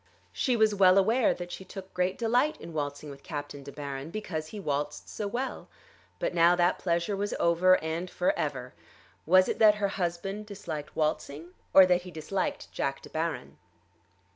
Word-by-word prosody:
She 245 - 0
was 220 -2 +3
well 190 -2 +5
aware 220 +5 +4
that 175 0 -7
she 190 - -7
took 190 0 -10
great 180 +1 0
delight 245 +6 +1
in 165 - -9
waltzing 145 -1 -4
with 140 - -12
Captain 145 -2 -6
De 140 +1 -9
Baron 140 0 -6
because 165 -6 -4
he 210 - -8
waltzed 145 -4 -3
so 210 - -4
well. 250 +6 -4 0.5
But - - -2
now 170 +1 +5
that 175 0 +2
pleasure 170 +3 0
was 205 +1 -2
over, 180 +2 +4
and 165 +3 -3
for 180 - +1
ever! 130 -4 -3 0.5
Was 185 +2 +6
it - - -2
that 215 -2 +7
her 205 -1 0
husband 195 +3 -3
disliked 165 -8 -7
waltzing, 155 +1 -2 0.2
or 190 - +9
that 180 0 +3
he 180 - -10
disliked 170 +3 -3
Jack 135 0 -3
De - - -12
Baron? 160 0 -3
175 Hz, 180 wpm, -28 LUFS, 155-195 Hz, 0.5 s, or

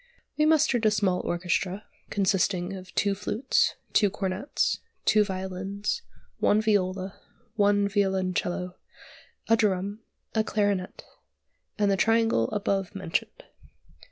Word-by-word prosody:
We 305 0 +3
mustered 305 -7 +3
a - - +6
small 195 -3 +1
orchestra, 180 +3 -2 0.2
consisting 190 -2 +1
of 185 -1 -9
two 200 -1 +2
flutes, 210 +6 +1 0.2
two 205 - +4
cornets, 195 +4 -1 0.3
two 215 -1 +5
violins, 190 - -3 0.4
one 210 - +4
viola, 195 -3 0 0.3
one 205 -1 +3
violoncello, 185 -2 -1 0.7
a 225 - +5
drum, 205 -1 0 0.3
a 220 - +2
clarionet, 205 -4 -1 0.7
and 205 -2 +2
the 195 - +2
triangle 225 - +3
above 200 -1 -1
mentioned. 185 -4 -3
200 Hz, 110 wpm, -27 LUFS, 185-210 Hz, 0.7 s, a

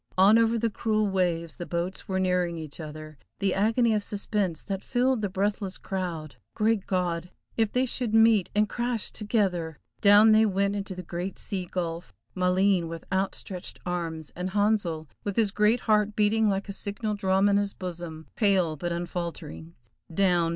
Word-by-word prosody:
On 200 +4 +7
over 230 0 +3
the 230 0 0
cruel 215 0 0
waves, 175 -5 -1
the 175 - -6
boats 175 +2 -3
were 190 -1 -1
nearing 180 -2 +1
each 155 -1 -7
other. 155 -1 -8 0.2
The 195 -2 0
agony 225 +3 +2
of 210 - +1
suspense 200 -5 -2
that 195 -2 -4
filled 255 0 +1
the 205 - -1
breathless 200 0 -1
crowd! 170 -6 -5 0.2
Great 215 -2 +1
God! 180 -2 -1 0.3
if 220 -2 +1
they 255 +1 +2
should 245 -2 +1
meet 225 -3 +5
and 210 0 +3
crash 240 0 -2
together! 185 - -1 0.2
Down 205 +2 +7
they 215 +1 +6
went 200 0 0
into 195 -2 -4
the 180 - -6
great 175 +3 -5
sea 185 -3 -4
gulf; 170 -1 -4 0.2
Maleen 185 -1 +2
with 165 0 -7
outstretched 190 -1 -3
arms, 165 -3 -3
and 180 +1 -3
Handsel 200 -6 0 0.2
with 200 -2 -3
his 220 -3 +2
great 210 +4 +2
heart 210 -1 +2
beating 215 +1 +3
like 195 0 -1
a 200 - -5
signal 205 +2 -3
drum 195 -1 +2
in 200 0 +4
his 200 -1 -1
bosom, 170 -3 -6
pale 190 -7 +2
but 175 +3 -4
unfaltering. 170 - -5 0.4
Down! 175 -2 +2
195 Hz, 170 wpm, -27 LUFS, 175-210 Hz, 0.4 s, On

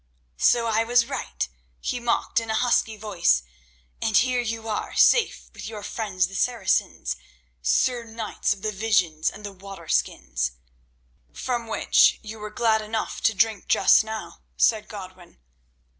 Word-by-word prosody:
"So 235 - +4
I 225 0 +2
was 240 +1 +3
right," - - -4 0.3
he 245 - -3
mocked 235 -1 +1
in 225 -1 -7
a 220 - 0
husky 225 -2 +1
voice, 190 - +1 0.6
"and 220 -3 +2
here 250 0 +3
you 225 -1 -4
are, 215 -2 -3
safe 475 -3 +3
with - - -8
your 215 -2 -7
friends 200 -4 -1
the 195 - -10
Saracens, 190 - 0 0.5
Sir 235 - +2
Knights 225 -1 -3
of 200 -1 -2
the 215 - 0
visions 190 -7 +1
and 210 - -11
the 200 - -6
water 195 -3 -11
skins—" 65 - -1 0.8
"From 240 -2 -3
which 220 - +4
you 220 0 -8
were 210 0 -6
glad 220 -1 +2
enough 215 +1 -4
to 220 - +2
drink 220 -1 +1
just - - +5
now," 220 0 -7 0.2
said 220 -2 +3
Godwin. 185 -4 -11
215 Hz, 155 wpm, -25 LUFS, 190-230 Hz, 0.8 s, just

